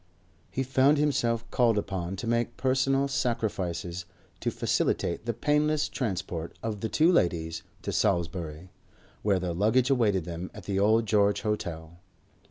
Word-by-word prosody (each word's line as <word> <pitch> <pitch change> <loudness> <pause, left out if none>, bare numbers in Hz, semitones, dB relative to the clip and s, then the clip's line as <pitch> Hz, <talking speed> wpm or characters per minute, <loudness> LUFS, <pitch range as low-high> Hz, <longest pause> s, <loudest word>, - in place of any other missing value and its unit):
He 135 - -2
found 135 +3 +4
himself 120 -6 +1
called 115 -3 +3
upon 95 -2 -2
to 95 - -6
make 120 0 0
personal 135 +1 +2
sacrifices 95 -9 -2 0.3
to - - -1
facilitate 85 +6 0
the 115 - +1
painless 150 +4 +2
transport 90 - -4
of 110 -2 -3
the 110 - -2
two 160 +8 +4
ladies 85 - +1 0.2
to - - -2
Salisbury, 85 0 -1 0.5
where 100 -2 +2
their 90 -1 -2
luggage 110 +8 +2
awaited 105 -9 +2
them 85 +1 -5
at - - -9
the 100 -1 -1
Old 110 +3 +4
George 105 -1 +2
Hotel. 85 -6 -4
105 Hz, 145 wpm, -28 LUFS, 90-125 Hz, 0.5 s, found